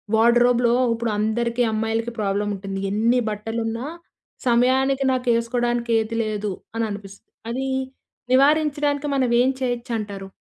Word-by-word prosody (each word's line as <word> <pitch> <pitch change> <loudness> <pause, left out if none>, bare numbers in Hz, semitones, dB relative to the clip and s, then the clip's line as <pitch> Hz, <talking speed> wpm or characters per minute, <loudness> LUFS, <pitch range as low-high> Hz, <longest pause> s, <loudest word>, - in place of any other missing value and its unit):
వార్డ్‌రోబ్‌లో, 240 +1 +4 0.2
ఉప్పుడు 230 -1 -2
అందరికి 235 +3 0
అమ్మాయిలకి 225 +2 -1
ప్రాబ్లమ్ 205 0 0
ఉంటుంది. 195 0 -5
ఎన్ని 230 +4 +2
బట్టలున్నా 225 +3 -3 0.6
సమయానికి 260 +3 +3
నాకేసుకోవడానికి 240 -1 0
ఏది 220 +1 -3
లేదు 210 -1 -2 0.2
అని 230 0 0
అనిపిస్తది. 200 0 -10 0.2
అదీ 265 +3 -2 0.7
నివారించడానికి 290 +1 +2
మనం 260 -2 +2
ఏం 255 - +3
చేయొచ్చు 245 -1 -2
అంటారు? 200 -3 -6
235 Hz, 115 wpm, -22 LUFS, 215-250 Hz, 0.7 s, వార్డ్‌రోబ్‌లో